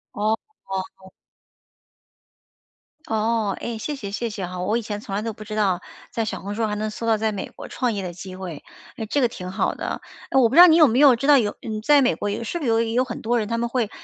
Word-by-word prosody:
哦。 205 - -4 2.0
哦， 220 -1 0
唉， 235 -1 -4
谢 290 +7 -4
谢 205 -7 -6
谢 235 +3 -2
谢 205 -3 -4
哈， 180 +1 -7
我 210 +5 +1
以 - - -2
前 210 -2 -5
从 200 - -7
来 200 - 0
都 225 0 -3
不 215 - -10
知 215 0 -6
道 190 -4 +1 0.3
在 230 - -2
小 220 - -4
红 200 +1 -5
书 225 +1 0
还 210 -1 -2
能 215 +1 -2
搜 215 +2 -6
到 225 -1 +3
在 220 0 0
美 195 - -5
国 - - -10
创 245 -3 -1
业 200 - -3
的 180 -2 -5
机 185 +2 -9
会， 175 -6 -7 0.3
诶， 225 -4 -4
这 285 - 0
个 250 - +4
挺 185 -5 -7
好 190 - 0
的， - - -4 0.3
呃， 265 - +4
我 245 - +6
不 230 - -3
知 345 - +10
道 360 - +11
你 325 -1 +6
有 310 -4 +8
没 245 +3 +2
有 280 -4 +8
知 275 - -2
道 290 -2 +8
有， 210 -4 0
嗯， 215 -2 -4
在 290 +4 +5
美 255 - +3
国 205 - -3
有 210 +3 -3
是 345 - -3
不 - - -6
是 - - +1
有 225 0 +3
有 230 +2 +1
很 260 - -6
多 240 +2 +1
人 215 - -2
他 230 - 0
们 235 +1 0
会 235 -3 -1
220 Hz, 285 characters per minute, -23 LUFS, 205-240 Hz, 2.0 s, 道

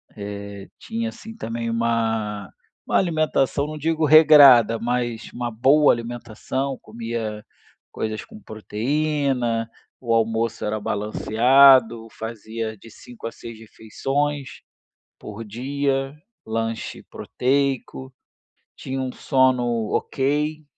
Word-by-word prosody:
Eh, 100 -1 -8
tinha, 230 +1 -4
assim, 225 -1 -11
também 115 - -4
uma 115 -3 -1 0.4
uma - - +1
alimentação, 155 -5 +1
não 155 0 -6
digo 160 +1 0
regrada, 145 -7 +7
mas 120 -1 -3
uma 120 0 -3
boa 135 +7 +4
alimentação, 120 +3 -4
comia 110 -1 -5 0.5
coisas 110 0 -4
com 220 -1 -13
proteína, 125 - -1 0.3
o 120 -3 -1
almoço 115 0 0
era 105 +1 -2
balanceado, 115 +3 +4
fazia 110 0 -6
de 115 - -15
5 120 +2 -13
a - - -6
6 115 -1 -11
refeições 135 +6 -4 0.6
por 105 +2 -8
dia, 135 +4 -2 0.3
lanche 115 0 -4
proteico, 135 0 -2 0.7
tinha 135 0 -4
um 130 -1 -3
sono 130 -2 +2 0.3
ok. 150 +3 -1
120 Hz, 105 wpm, -22 LUFS, 110-140 Hz, 0.7 s, regrada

